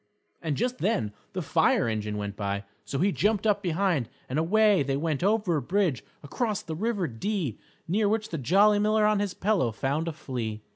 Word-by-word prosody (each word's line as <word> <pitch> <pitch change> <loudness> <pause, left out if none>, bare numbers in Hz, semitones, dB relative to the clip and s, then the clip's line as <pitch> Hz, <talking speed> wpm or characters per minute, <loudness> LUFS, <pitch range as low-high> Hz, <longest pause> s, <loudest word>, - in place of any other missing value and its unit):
And 155 -4 -2
just 250 +2 -1
then 115 - 0 0.2
the - - -3
fire - - +2
engine 105 -1 -2
went 105 -1 -4
by, 100 -1 -2 0.2
so 135 - -3
he 195 +7 +2
jumped 210 +2 +1
up 205 -2 +2
behind 175 - 0 0.2
and 135 +4 -1
away 205 +3 +4
they 135 0 0
went 155 -1 -1
over 200 -4 +2
a - - -1
bridge 185 -8 0 0.2
across 210 - -2
the 160 - -5
River 205 +1 -1
Dee 150 - -3 0.3
near 205 +4 +2
which 220 0 -1
the 165 - -4
Jolly 200 - +4
Miller 215 +1 +3
on 210 -1 +3
his 200 -2 -2
pillow 190 - +1
found 140 +8 -1
a - - 0
flea. 115 -7 -5
175 Hz, 195 wpm, -27 LUFS, 135-210 Hz, 0.3 s, away